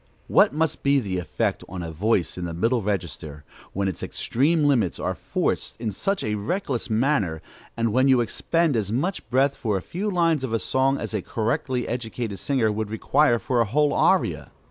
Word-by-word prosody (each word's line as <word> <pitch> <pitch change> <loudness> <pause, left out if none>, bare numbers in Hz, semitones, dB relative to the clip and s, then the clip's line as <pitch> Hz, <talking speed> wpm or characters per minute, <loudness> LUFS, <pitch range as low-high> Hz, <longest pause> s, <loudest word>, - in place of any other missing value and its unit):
What - - +4
must 155 +1 -1
be 140 0 +3
the 95 -7 -2
effect 90 - -2
on 90 0 -5
a 85 - -5
voice 90 0 0
in 90 - -4
the 85 -1 -5
middle 115 +7 +1
register, 80 -7 -4 0.3
when 100 0 -1
its 95 -7 -4
extreme 150 +6 +1
limits 120 - +2
are - - -1
forced - - -2
in 110 -2 -2
such 195 - -1
a 105 - -1
reckless 125 - -2
manner, 110 - +1 0.4
and 115 -2 0
when 130 +2 +4
you 130 -2 +5
expend 160 +6 +1
as 105 -3 -1
much 170 - -2
breath 135 +2 +2
for 105 -4 -1
a - - -4
few 200 +5 -3
lines 165 -6 +2
of 125 -4 -3
a - - +3
song 135 +4 +1
as - - -5
a 105 - -1
correctly 120 - -2
educated 115 -4 -4
singer 125 -4 +1
would 105 0 -3
require 120 +4 +2
for 120 +1 0
a - - +3
whole 145 +6 +2
aria? - - +2
115 Hz, 195 wpm, -24 LUFS, 100-140 Hz, 0.4 s, you